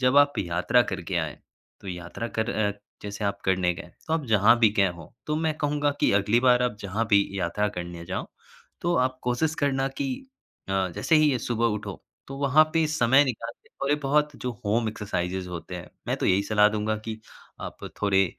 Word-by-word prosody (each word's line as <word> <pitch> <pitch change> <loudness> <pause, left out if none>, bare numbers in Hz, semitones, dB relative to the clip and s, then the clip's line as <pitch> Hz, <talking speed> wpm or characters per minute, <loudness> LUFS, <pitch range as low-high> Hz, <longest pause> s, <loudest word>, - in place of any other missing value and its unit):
जब 130 +1 +3
आप 145 0 +5
यात्रा 90 +7 +2
करके 95 -4 -4
आएँ, 80 -4 -2 0.4
तो 100 - -9
यात्रा 90 +5 -5
कर 110 +2 +1
अ, 105 -3 0 0.3
जैसे 105 +1 -5
आप 100 0 -1
करने 90 -2 +2
गए। 85 - -10 0.2
तो 160 - -3
आप 160 -3 -1
जहाँ 110 +1 +5
भी 115 -2 +6
गए 100 -1 +5
हों, 85 -2 -11 0.2
तो 150 - 0
मैं 160 0 0
कहूँगा 145 0 +1
कि - - +4
अगली 105 +4 +3
बार 125 -1 +4
आप 120 -4 0
जहाँ 105 +4 -2
भी 100 -1 +6 0.2
यात्रा 95 +4 0
करने 85 -1 -6
जाओ, 95 +1 -3 0.5
तो 175 0 +1
आप 130 0 +1
कोशिश 125 +6 0
करना 135 -1 +1
कि 135 +1 -3 0.6
अ, - - -2 0.2
जैसे 160 - +3
ही 155 -1 +5
ये 130 - 0
सुबह 115 -1 0
उठो, 100 -3 -6 0.2
तो 135 - -7
वहाँ 140 +2 +5
पे 160 -1 +3
समय 135 -1 +4
निकाल 115 -3 -3
के - - -24
थोड़े 140 +1 -1
बहुत 150 +2 +2
जो 125 - -1
होम 110 +2 +1
एक्सरसाइज़ेज़ 95 -4 -3
होते 90 +1 -7
हैं, 85 - -9 0.2
मैं - - 0
तो - - -1
यही 95 +2 +3
सलाह 105 0 +4
दूँगा 110 0 -1
कि 110 -1 -5 0.4
आप - - -7 0.2
थोड़े 95 -1 +4
110 Hz, 205 wpm, -26 LUFS, 95-135 Hz, 0.6 s, भी